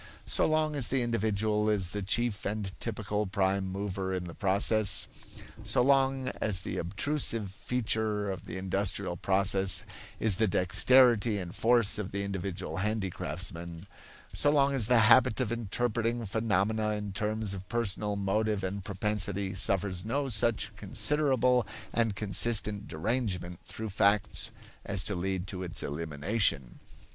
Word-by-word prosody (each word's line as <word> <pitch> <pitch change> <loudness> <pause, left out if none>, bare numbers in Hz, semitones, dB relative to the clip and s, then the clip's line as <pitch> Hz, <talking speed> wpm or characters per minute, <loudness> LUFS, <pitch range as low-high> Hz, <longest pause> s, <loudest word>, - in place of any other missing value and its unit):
So - - +1
long 155 -1 +1
as 140 -5 +3
the 130 -2 +1
individual 110 -2 0
is 95 -5 +1
the 105 - -4
chief 110 +2 0
and 100 -1 -3
typical 105 -2 -2
prime 95 0 0
mover 95 -1 -3
in 90 - -3
the 85 -1 -8
process; 100 +2 +1 0.6
so - - +2
long 135 -1 +2
as 100 -5 +1
the - - -5
obtrusive 110 - 0
feature 110 -2 -2
of 95 -3 -7
the 95 - -6
industrial 95 0 -1
process 95 +1 +3 0.4
is 105 -5 +2
the 110 - +2
dexterity 110 +4 +4
and 90 -3 -5
force 115 -3 +3
of 100 -2 -4
the 100 0 -3
individual 95 -1 -4
handicraftsman; 90 -4 -3 0.5
so 145 - +2
long 140 -1 +3
the 120 -1 +4
habit 130 +1 +5
of 110 - -1
interpreting 120 +1 -1
phenomena 110 0 0
in 105 -1 -5
terms 105 0 -2
of 95 -1 -8
personal 105 -3 -1
motive 100 +1 -1
and 95 +1 -4
propensity 100 -1 -2
suffers 95 -1 0
no 135 +5 -2
such 110 -2 0
considerable 125 +3 +2 0.3
and 115 -3 +1
consistent 105 0 +1
derangement 90 -2 -3
through 110 0 -6
facts 100 +1 +1 0.3
as 100 -2 -1
to 100 - -2
lead 95 0 -2
to 95 -1 -6
its 90 -2 -4
elimination. 75 - -1
105 Hz, 140 wpm, -29 LUFS, 95-115 Hz, 0.6 s, habit